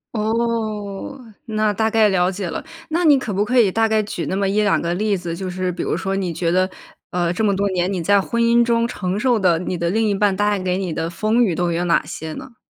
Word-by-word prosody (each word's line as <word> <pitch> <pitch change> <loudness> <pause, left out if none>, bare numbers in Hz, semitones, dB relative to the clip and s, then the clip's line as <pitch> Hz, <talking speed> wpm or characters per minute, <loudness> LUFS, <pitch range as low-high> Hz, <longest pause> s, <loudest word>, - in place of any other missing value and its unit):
哦， 220 +1 -2 0.3
那 215 -1 0
大 220 +2 +1
概 220 -1 +4
了 185 -2 +2
解 195 -1 -4
了， - - -5 0.3
那 335 +3 0
你 295 -4 +6
可 235 -6 -4
不 200 +2 +1
可 250 +3 +2
以 215 -5 +5
大 225 +4 +1
概 220 -1 +2
举 205 -5 -4
那 190 - -2
么 200 - +1
1-2 205 +1 +2
个 170 +1 -1
例 205 +1 0
子， 175 -2 -5
就 185 +1 -5
是 185 0 -2
比 - - -4
如 - - -1
说 195 0 -2
你 185 -3 -2
觉 165 +1 -1
得， 185 +1 +2 0.4
呃， 175 -1 0
这 220 - -2
么 205 - +3
多 200 +1 0
年 180 0 0
你 185 -3 -2
在 200 +4 +3
婚 235 +4 -2
姻 235 +1 +4
中 235 0 +1
承 185 -3 -3
受 245 0 +2
的， 180 -5 +2
你 180 +1 -3
的 170 0 -1
另 220 +4 +1
一 205 - +1
半 200 0 +2
带 205 +1 +1
给 185 -1 -1
你 185 -4 -3
的 165 - -2
风 215 +7 +1
雨 190 - +1
都 175 +1 0
有 170 +1 -1
哪 170 -3 +2
些 160 0 -6
呢？ 260 +7 -9
200 Hz, 275 characters per minute, -20 LUFS, 180-220 Hz, 0.4 s, 你